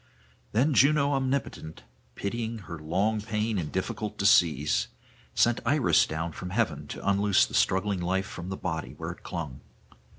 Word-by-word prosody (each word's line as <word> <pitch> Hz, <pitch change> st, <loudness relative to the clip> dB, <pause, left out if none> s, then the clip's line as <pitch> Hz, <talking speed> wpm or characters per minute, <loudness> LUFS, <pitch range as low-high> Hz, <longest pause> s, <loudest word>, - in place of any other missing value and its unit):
Then 135 Hz, +8 st, +2 dB
Juno 140 Hz, +2 st, +4 dB
omnipotent, 130 Hz, -, -2 dB, 0.3 s
pitying 115 Hz, +2 st, -3 dB
her 85 Hz, -1 st, -7 dB
long 95 Hz, +8 st, 0 dB
pain 105 Hz, -1 st, -1 dB
and 80 Hz, -4 st, -4 dB
difficult 105 Hz, +3 st, -3 dB
decease, 80 Hz, -7 st, +3 dB, 0.5 s
sent 120 Hz, 0 st, +3 dB
Iris 135 Hz, +2 st, +3 dB
down 80 Hz, +2 st, -3 dB
from 90 Hz, +2 st, -7 dB
heaven 80 Hz, -8 st, -1 dB
to -, -, -7 dB
unloose 100 Hz, 0 st, +4 dB
the -, -, -12 dB
struggling 95 Hz, 0 st, +1 dB
life 95 Hz, +2 st, 0 dB
from 90 Hz, 0 st, -7 dB
the 95 Hz, -, -4 dB
body 80 Hz, -3 st, -4 dB
where -, -, -4 dB
it -, -, -12 dB
clung. 75 Hz, -5 st, -6 dB
100 Hz, 155 wpm, -28 LUFS, 85-115 Hz, 0.5 s, Juno